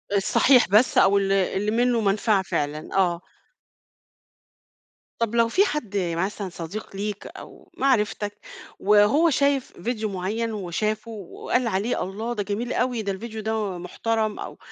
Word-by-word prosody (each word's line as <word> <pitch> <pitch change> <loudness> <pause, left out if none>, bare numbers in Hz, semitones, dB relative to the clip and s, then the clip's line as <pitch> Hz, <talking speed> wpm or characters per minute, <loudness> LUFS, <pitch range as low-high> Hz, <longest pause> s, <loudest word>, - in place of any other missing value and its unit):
الصحيح 245 +6 +4
بس 215 +6 +4
أو 195 +1 +5
ال 195 -1 +1
اللي 195 +2 +1
منّه 240 +1 +2
مَنفعة 205 0 +2
فعلًا 150 -3 -3
آه. 175 -3 +2 2.0
طب 230 0 -1
لو 230 -1 +4
في 380 - +3
حد 295 - -3
مثلًا 190 +3 -2
صديق 180 +5 -7
ليك، 205 0 -4
أو - - -13
معرفتك 210 -5 0 0.4
وهو 210 - +4
شايف 280 -2 +1
فيديو 220 -2 -2
معيّن 205 +5 -2
وشافُه 215 +3 -2
وقال 225 +4 -2
عليه 215 +3 -1
الله 220 +6 -4
ده 210 -3 -2
جميل 210 +5 -3
أوي، 245 -2 0
ده 200 -2 -2
الفيديو 220 +3 -6
ده 215 -3 -2
محترم 215 +4 -2
أو - - -7
210 Hz, 140 wpm, -24 LUFS, 195-230 Hz, 2.0 s, أو